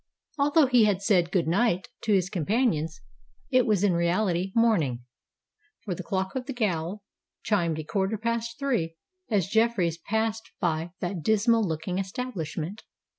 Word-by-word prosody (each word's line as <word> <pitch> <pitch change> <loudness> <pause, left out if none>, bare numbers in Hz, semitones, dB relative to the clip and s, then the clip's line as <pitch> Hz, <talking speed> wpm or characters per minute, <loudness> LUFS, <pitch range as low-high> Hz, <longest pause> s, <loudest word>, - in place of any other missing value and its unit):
Although 290 +2 +5
he 250 -4 +5
had 200 -2 +1
said 180 -5 +3
"good 180 -5 +1
night" 185 +1 +1 0.2
to 220 - +1
his 190 -2 +2
companions, 175 - 0 0.5
it 255 -2 +4
was 205 -3 +2
in 200 -3 +4
reality 175 +2 +1
morning; 165 - +2 0.8
for 185 - -2
the 175 - -5
clock 190 +1 -2
of 260 -1 -4
the 275 - -3
gaol 195 -4 -2 0.4
chimed 170 -7 +1
a 155 - -4
quarter 195 +5 -1
past 230 +1 -2
three 230 - -1 0.3
as 200 -6 +1
Jeffreys 205 -6 +1
passed 220 +4 -2
by 165 -1 0
that 175 -1 -3
dismal 220 - +3
looking 170 +1 -2
establishment. 190 - -4
195 Hz, 150 wpm, -27 LUFS, 170-225 Hz, 0.8 s, Although